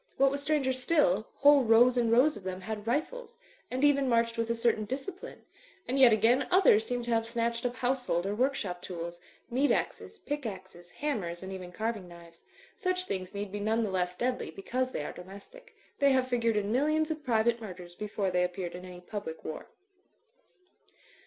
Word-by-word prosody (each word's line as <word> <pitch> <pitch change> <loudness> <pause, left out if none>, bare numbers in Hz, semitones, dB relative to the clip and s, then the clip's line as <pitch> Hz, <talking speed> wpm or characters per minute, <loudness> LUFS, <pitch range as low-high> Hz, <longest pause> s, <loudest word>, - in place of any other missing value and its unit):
What 275 0 +4
was 280 0 -3
stranger 280 -3 +1
still, 255 - +2
whole 285 -1 +6
rows 240 +2 +5
and 235 -2 +2
rows 260 +6 +5
of 210 - -8
them 185 0 -5
had 215 +2 -6
rifles, 470 - -2 0.3
and 255 +2 -2
even 280 -2 +4
marched 230 -1 +2
with 230 0 -2
a 230 - +1
certain 230 -1 +1
discipline; 280 - -7 0.4
and 265 +2 0
yet 255 -3 +8
again, 235 +5 +3
others 225 - +5
seemed 245 -1 -2
to 240 - -3
have 225 0 +1
snatched 235 +1 -1
up 245 - -6
household 250 -9 0
or 200 - -1
work 260 +5 +1
shop 180 -6 -4
tools, 170 -1 -6 0.3
meat 270 +4 +2
axes, - - -2
pick 295 -7 -4
axes, 185 -3 -9
hammers 190 -9 -3
and 190 0 -6
even 180 -2 -7
carving 215 -1 -3
knives. 170 -1 -14 0.3
Such 365 0 -1
things 185 - -4
need 200 -1 -4
be 205 - -4
none 220 +3 +1
the 210 - -2
less 180 -1 -1
deadly 250 0 -2
because 250 +9 -3
they 145 - -3
are - - -5
domestic. 200 - -13 0.2
They 280 -1 +5
have 260 -1 +2
figured 230 -3 +1
in 205 0 -1
millions 310 +5 +1
of 305 -1 -5
private 235 -1 +1
murders 180 -4 -9
before 205 0 -2
they 180 0 +2
appeared 180 0 -3
in 180 +1 -8
any 180 -1 -10
public 180 -4 -7
war. 155 - -6
230 Hz, 195 wpm, -30 LUFS, 190-265 Hz, 0.4 s, yet